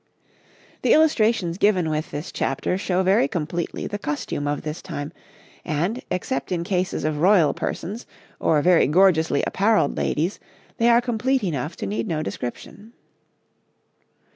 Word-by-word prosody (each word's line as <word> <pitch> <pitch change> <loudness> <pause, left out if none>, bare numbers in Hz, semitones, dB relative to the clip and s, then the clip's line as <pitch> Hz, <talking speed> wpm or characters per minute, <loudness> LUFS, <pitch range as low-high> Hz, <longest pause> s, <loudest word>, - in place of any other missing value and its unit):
] - - -30
The - - +4
illustrations 220 - +2
given 190 -5 +3
with 155 0 -2
this 150 +4 -6
chapter 135 +6 -1
show 185 -1 0
very 185 -6 +3
completely 170 +2 -3
the 205 - -4
costume 145 -2 -3
of 145 0 -2
this 155 +2 -5
time, 155 -3 -6 0.5
and, 175 +10 -1
except 175 -4 -3
in 170 -2 -1
cases 180 -2 -1
of 155 -1 -1
royal 180 -2 +4
persons 215 +7 -5 0.3
or 150 -2 +2
very 180 -1 +5
gorgeously 160 -3 +3
apparelled 205 -6 +2
ladies, 170 +7 -1 0.4
they 230 +1 +3
are 235 0 +5
complete 245 +2 0
enough 155 -2 -2
to - - -5
need 105 +3 -2
no 155 -2 -1
description. 205 - -7
175 Hz, 145 wpm, -23 LUFS, 150-205 Hz, 0.5 s, very